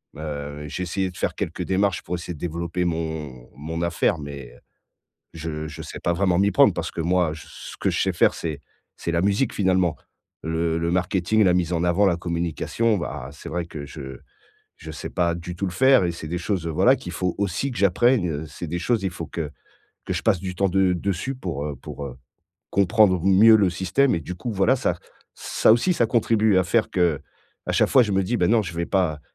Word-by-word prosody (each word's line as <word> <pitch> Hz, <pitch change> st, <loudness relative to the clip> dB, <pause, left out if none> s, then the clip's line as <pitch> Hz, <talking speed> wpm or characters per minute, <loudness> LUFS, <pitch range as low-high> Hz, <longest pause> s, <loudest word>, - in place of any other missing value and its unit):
heu, 75 Hz, -1 st, -6 dB
j'ai 90 Hz, -, -4 dB
essayé 95 Hz, +2 st, -1 dB
de 90 Hz, -, -13 dB
faire -, -, -1 dB
quelques -, -, -3 dB
démarches 95 Hz, 0 st, 0 dB
pour -, -, -6 dB
essayer 85 Hz, 0 st, -6 dB
de -, -, -14 dB
développer 85 Hz, +2 st, -2 dB
mon 80 Hz, -7 st, -4 dB
mon 80 Hz, +4 st, -5 dB
affaire 85 Hz, +1 st, +1 dB
mais, 70 Hz, -4 st, -8 dB
heu, -, -, -19 dB, 0.8 s
je 80 Hz, -1 st, -5 dB
je 75 Hz, -, -8 dB
sais -, -, -8 dB
pas 85 Hz, -, 0 dB
vraiment 90 Hz, 0 st, +1 dB
m'y 100 Hz, +1 st, +3 dB
prendre -, -, +5 dB
parce -, -, -3 dB
que -, -, -5 dB
moi 85 Hz, -1 st, +1 dB
je 80 Hz, -, -10 dB
ce -, -, -10 dB
que -, -, +1 dB
je -, -, -1 dB
sais -, -, +1 dB
faire -, -, +3 dB
c'est 80 Hz, -4 st, -4 dB, 0.4 s
c'est 85 Hz, -, -3 dB
la 85 Hz, -, +1 dB
musique 100 Hz, +5 st, +1 dB
finalement. 95 Hz, -4 st, +2 dB, 0.5 s
Le 80 Hz, 0 st, -1 dB
le 85 Hz, 0 st, -1 dB
marketing, 90 Hz, +4 st, +1 dB
la 90 Hz, -2 st, +4 dB
mise 90 Hz, -1 st, 0 dB
en 85 Hz, 0 st, 0 dB
avant, 90 Hz, +3 st, +3 dB
la 85 Hz, -, +2 dB
communication, 85 Hz, +6 st, -1 dB
bah, 70 Hz, -5 st, -5 dB
c'est 75 Hz, +3 st, -10 dB
vrai 85 Hz, +1 st, -2 dB
que 75 Hz, -4 st, -8 dB
je 65 Hz, -3 st, -8 dB, 0.6 s
je 80 Hz, -, -9 dB
sais 80 Hz, -, -6 dB
pas 85 Hz, -1 st, 0 dB
du 85 Hz, +1 st, -7 dB
tout 100 Hz, -, -2 dB
le 90 Hz, -, -3 dB
faire 130 Hz, +5 st, +5 dB
et 85 Hz, -, 0 dB
c'est 85 Hz, -2 st, -8 dB
des 90 Hz, -, -2 dB
choses, 90 Hz, -1 st, -2 dB
heu, -, -, -2 dB
voilà 125 Hz, -, +4 dB
qu'il 90 Hz, -8 st, -8 dB
faut 90 Hz, -1 st, -1 dB
aussi 100 Hz, +7 st, -1 dB
que 120 Hz, -, -7 dB
j'apprenne, 100 Hz, +2 st, +3 dB
heu, 75 Hz, 0 st, -4 dB
c'est 80 Hz, +3 st, -7 dB
des 85 Hz, +3 st, -3 dB
choses, 115 Hz, +2 st, 0 dB
il 95 Hz, -, 0 dB
faut 85 Hz, -2 st, -6 dB
que 80 Hz, -4 st, -5 dB, 0.5 s
que -, -, -2 dB
je -, -, -2 dB
passe 90 Hz, -, +3 dB
du 90 Hz, 0 st, -5 dB
temps 100 Hz, +1 st, +1 dB
de 95 Hz, 0 st, +3 dB
dessus 100 Hz, +9 st, -2 dB
pour, 85 Hz, -, -4 dB
heu 75 Hz, -2 st, -4 dB
pour, 70 Hz, +2 st, -8 dB
heu, 65 Hz, -2 st, -8 dB, 0.5 s
comprendre 100 Hz, -2 st, +3 dB
mieux 100 Hz, +4 st, +7 dB
le 100 Hz, -4 st, +3 dB
système. 95 Hz, +10 st, +1 dB
Et -, -, -2 dB
du 90 Hz, +4 st, -6 dB
coup 120 Hz, +5 st, -4 dB
voilà, 105 Hz, +6 st, +3 dB
ça 130 Hz, -, -1 dB, 0.4 s
ça -, -, +3 dB
aussi 120 Hz, +11 st, +3 dB
ça 120 Hz, -, +2 dB
contribue 110 Hz, -3 st, +3 dB
à 95 Hz, -, +2 dB
faire 110 Hz, +5 st, +1 dB
que, 85 Hz, -6 st, +1 dB, 0.5 s
à -, -, -1 dB
chaque -, -, +3 dB
fois, 130 Hz, -, +6 dB
je 105 Hz, -, -3 dB
me 95 Hz, -, +2 dB
dis: 120 Hz, +5 st, 0 dB
«Ben 90 Hz, 0 st, +2 dB
non 115 Hz, 0 st, +4 dB
je 85 Hz, -3 st, -7 dB
vais 85 Hz, 0 st, -2 dB
pas, 85 Hz, -6 st, 0 dB
90 Hz, 235 wpm, -23 LUFS, 80-100 Hz, 0.8 s, mieux